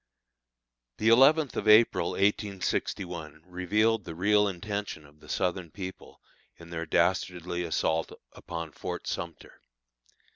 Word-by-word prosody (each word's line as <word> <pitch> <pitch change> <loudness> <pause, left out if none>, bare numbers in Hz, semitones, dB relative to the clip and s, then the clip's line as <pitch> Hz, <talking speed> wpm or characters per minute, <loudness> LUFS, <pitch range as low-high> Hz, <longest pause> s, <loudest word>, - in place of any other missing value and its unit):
The 110 - +2
eleventh 135 +4 +5
of 110 - -3
April, 105 -5 +5
1861, 90 -5 -2
revealed 105 +5 +1
the 80 - -8
real 105 +3 +3
intention 100 -3 -4
of 75 +1 -20
the - - -16
Southern 90 -1 -1
people 95 +2 -9 0.4
in 85 0 -13
their 85 -1 -4
dastardly 90 +2 0
assault 80 -1 0 0.2
upon 85 -2 -7
Fort - - -6
Sumter. - - -6
90 Hz, 115 wpm, -28 LUFS, 85-105 Hz, 0.4 s, eleventh